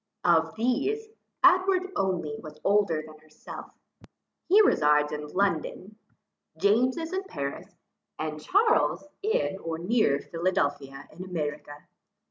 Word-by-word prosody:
Of 165 0 +3
these, 275 - -1 0.3
Edward 370 0 +4
only 180 -6 -1
was 155 0 -11
older 195 -6 +2
than 155 0 -14
herself; 155 0 -11 0.8
he 400 +4 +7
resides 150 - +3
in 150 0 -5
London. 195 +3 -2 0.6
James 240 +7 +3
is 325 +2 -4
in 380 +1 -1
Paris, 140 - -6 0.4
and 155 -1 -4
Charles 415 - +2 0.2
in 430 - 0
or 165 -2 -4
near 175 -5 +2
Philadelphia 145 -5 -2
in 175 +4 -9
America. 150 -4 -5
180 Hz, 115 wpm, -27 LUFS, 155-255 Hz, 0.8 s, he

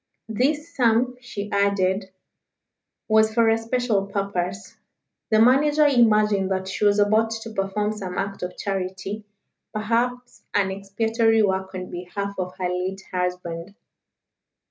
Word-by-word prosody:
This 295 +8 -1
sum, 245 0 +2
she 205 -4 -6
added, 200 -1 +1 1.0
was 220 0 +4
for 230 0 +3
a 225 - +3
special 225 -4 0
purpose. 195 +1 -3 0.5
The 215 0 +4
manager 290 +6 +5
imagined 215 -7 +4
that 190 0 -2
she 195 +2 -1
was 205 0 +4
about 215 +2 +3
to 225 0 -6
perform 205 +1 -1
some 190 -4 -6
act 195 0 -3
of 180 - -5
charity, 195 +2 -4 0.5
perhaps 240 +3 -1
an 195 -2 +2
expiatory 225 +3 +1
work 190 -1 -1
on 185 0 -6
behalf 190 +3 -4
of 180 0 -4
her 185 - -1
late 185 +2 -3
husband. 180 0 -3
205 Hz, 130 wpm, -24 LUFS, 190-225 Hz, 1.0 s, manager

